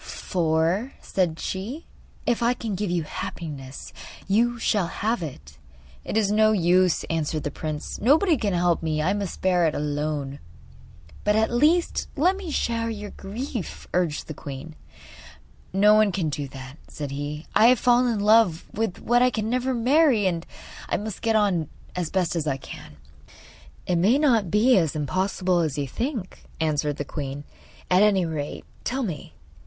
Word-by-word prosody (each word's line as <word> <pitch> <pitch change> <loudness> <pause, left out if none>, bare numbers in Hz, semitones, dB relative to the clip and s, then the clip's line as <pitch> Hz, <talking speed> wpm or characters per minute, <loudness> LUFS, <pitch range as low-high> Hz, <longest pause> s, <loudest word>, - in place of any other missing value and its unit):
'For,' 170 - 0
said 175 -4 -1
she, 225 - -4 0.4
'if 240 0 +1
I 240 +1 +2
can 225 -4 -4
give 195 +1 -2
you 175 -2 0
happiness 145 -4 -7 0.3
you 235 +4 +2
shall 210 -5 +1
have 220 +4 -1
it.' 75 - -8 0.4
'It - - -2
is 205 -2 +2
no 215 +1 +4
use,' 180 -2 +3
answered 155 -1 -1
the 145 - -3
prince; 155 +1 -5
'nobody 310 - +4
can 215 -6 -1
help 175 -1 +2
me. 155 -2 -1
I 185 +5 +2
must 200 -3 -4
bear 180 -3 +3
it 155 - -1
alone.' 145 -1 -2 0.8
'But 210 0 +2
at 220 +1 +2
least 310 +8 +2
let 350 +6 +3
me 385 -3 -7
share 230 -5 -1
your 210 -2 -6
grief,' 225 +1 -6
urged 175 -4 0
the 155 - -5
queen. 145 +2 -8 1.0
'No 205 +3 +5
one 215 -1 +4
can 170 -4 -1
do 145 -1 -3
that,' 135 +2 -10
said 145 -2 -6
he. 145 +2 -5
'I 225 - +6
have 250 -1 +5
fallen 245 0 +4
in 215 -3 -1
love 205 -6 +4
with 220 -4 -2
what 240 +1 +3
I 250 - +5
can 220 -2 -2
never 255 +1 0
marry, 255 -2 +3
and 170 -3 -1 0.4
I - - +1
must 210 -1 -6
get 225 -1 +1
on 190 -8 +2 0.3
as 175 -3 -2
best 185 -2 0
I 135 -2 0
can.' 135 - -11 0.9
'It 180 - +1
may 205 +10 +4
not 235 - +3
be 225 +8 +4
as 160 -4 -1
impossible 185 +4 0
as 155 -4 -1
you 140 -1 -1
think,' 230 - -4
answered 150 -2 0
the 145 - -3
queen. 140 -1 -5 0.5
'At 180 +1 +5
any 200 -4 +4
rate, 155 -3 -4 0.2
tell 265 +2 -1
me. 170 - -6
185 Hz, 170 wpm, -25 LUFS, 155-225 Hz, 1.0 s, I